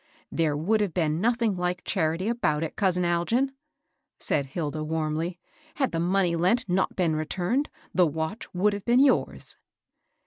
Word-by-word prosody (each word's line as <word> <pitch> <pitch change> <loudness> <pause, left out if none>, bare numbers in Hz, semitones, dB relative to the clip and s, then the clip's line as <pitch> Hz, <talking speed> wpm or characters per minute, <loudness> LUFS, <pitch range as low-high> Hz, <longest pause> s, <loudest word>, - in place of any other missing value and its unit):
'^ - - -37 0.3
There 155 -3 +1
would 210 +8 +1
have 200 -5 -1
been 160 -2 +1
nothing 230 -3 +1
Yk^ 180 0 -1
charity 165 0 0
about 170 -10 0
it, 160 - -4
cou^ 185 -3 +2
Algin," 200 +11 +1 0.7
said 140 -2 0
Hilda, 155 +1 -3
warmly. 160 +2 -2
^^ 310 0 -30
Had 270 -3 0
the 165 - -1
money 180 0 +2
lent 185 +8 +2
not 185 +1 0
been 170 -4 +1
returned, 180 - -1 0.2
the 180 -2 +4
watch 160 +8 -4
would 205 +3 +3
have 200 -1 -5
been 240 +2 +3
yours." 275 -1 +1
180 Hz, 170 wpm, -26 LUFS, 160-210 Hz, 0.7 s, the